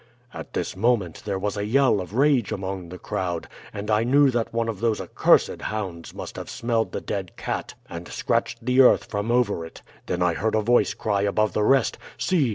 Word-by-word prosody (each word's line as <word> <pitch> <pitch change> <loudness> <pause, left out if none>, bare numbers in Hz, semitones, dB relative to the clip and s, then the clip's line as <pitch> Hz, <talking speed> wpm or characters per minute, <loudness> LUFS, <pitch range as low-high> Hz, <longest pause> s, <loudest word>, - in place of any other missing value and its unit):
"At - - -8
this - - -2
moment 105 -4 +1
there 100 -2 -1
was 100 +1 -2
a 100 - -2
yell 130 -3 +3
of 95 +4 -8
rage 135 -4 +3
among 95 -2 -4
the 90 - -8
crowd, 90 -2 -3 0.2
and 105 +2 -4
I 105 +1 +3
knew 135 +3 +4
that 120 -2 -1
one 115 0 -1
of 110 -4 -3
those 115 -1 +1
accursed - - +2
hounds 95 -6 -4
must - - -7
have - - -6
smelled 115 -1 -1
the - - -4
dead 95 -4 -5
cat - - -4
and 85 0 -8
scratched - - -1
the 125 +1 +5
earth 130 - +6
from 105 +2 -2
over 120 -8 +1
it. 80 - -11 0.2
Then 90 0 0
I 90 -1 +2
heard 110 +5 0
a 110 - +3
voice 120 +3 +3
cry 100 -2 0
above 105 +1 +1
the - - 0
rest, 135 +2 +3 0.2
'See! 160 -9 +2
105 Hz, 210 wpm, -24 LUFS, 95-120 Hz, 0.2 s, earth